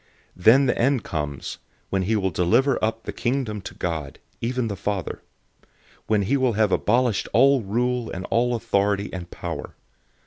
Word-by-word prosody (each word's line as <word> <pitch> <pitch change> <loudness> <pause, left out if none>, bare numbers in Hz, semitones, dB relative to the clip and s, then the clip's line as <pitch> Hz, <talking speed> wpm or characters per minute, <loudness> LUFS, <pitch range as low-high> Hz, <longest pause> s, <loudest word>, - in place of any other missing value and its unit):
015:024 90 - -15
Then 130 +5 +7
the 125 - +1
end 130 -2 +2
comes, 75 -3 -4 0.3
when 95 - +1
he 105 +5 +1
will 95 -3 0
deliver 115 - +2
up 110 +1 -1
the - - -4
Kingdom 120 -4 -2
to - - -9
God, 80 -5 -4 0.2
even 125 0 -1
the 100 - -3
Father; 100 -2 -3 0.9
when 105 -2 +2
he 125 +9 +1
will 130 -3 +2
have 105 -1 +2
abolished 120 -1 +1
all 135 +4 +5
rule 120 +3 -1
and 90 0 -5
all 120 +1 +2
authority 100 -2 0
and 90 -2 -6
power. 85 -5 -6
110 Hz, 170 wpm, -24 LUFS, 95-125 Hz, 0.9 s, Then